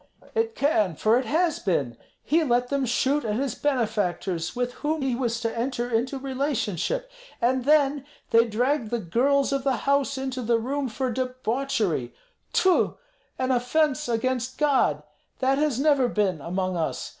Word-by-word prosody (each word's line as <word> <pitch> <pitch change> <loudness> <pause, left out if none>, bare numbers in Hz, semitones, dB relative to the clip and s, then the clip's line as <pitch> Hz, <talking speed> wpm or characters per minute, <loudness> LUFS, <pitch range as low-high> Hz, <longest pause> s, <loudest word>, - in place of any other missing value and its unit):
"It 455 0 0
can, 215 - +1
for 220 +9 +3
it 260 - -4
has 330 +1 +1
been. 140 - -1 0.3
He 325 +2 +2
let 245 -3 +1
them 275 -2 0
shoot 270 +5 +1
at 210 -2 -1
his 260 0 -1
benefactors, 195 - -1
with 245 0 -1
whom 300 0 -1
he 265 -2 0
was 235 -2 -1
to 230 -1 -2
enter 240 0 -2
into 245 +4 0
relationship; 275 - -2 0.3
and 250 +1 +1
then 290 -2 +3 0.3
they 230 +1 +5
dragged 245 +2 0
the 240 - 0
girls 265 +9 +1
of 275 -1 -1
the 270 -1 +2
house 280 0 +2
into 265 -1 -3
the 235 0 +2
room 265 +3 -2
for 255 +3 -2
debauchery. 250 - -1 0.4
Tfu! 370 -2 +2 0.4
an 260 0 0
offence 280 +3 +1
against 250 +2 -1
God! 290 -3 +2 0.3
That 270 +1 +1
has 295 -5 +1
never 280 -3 +3
been 195 -9 0
among 185 +2 -2
us! 160 - -2
255 Hz, 160 wpm, -25 LUFS, 225-280 Hz, 0.4 s, they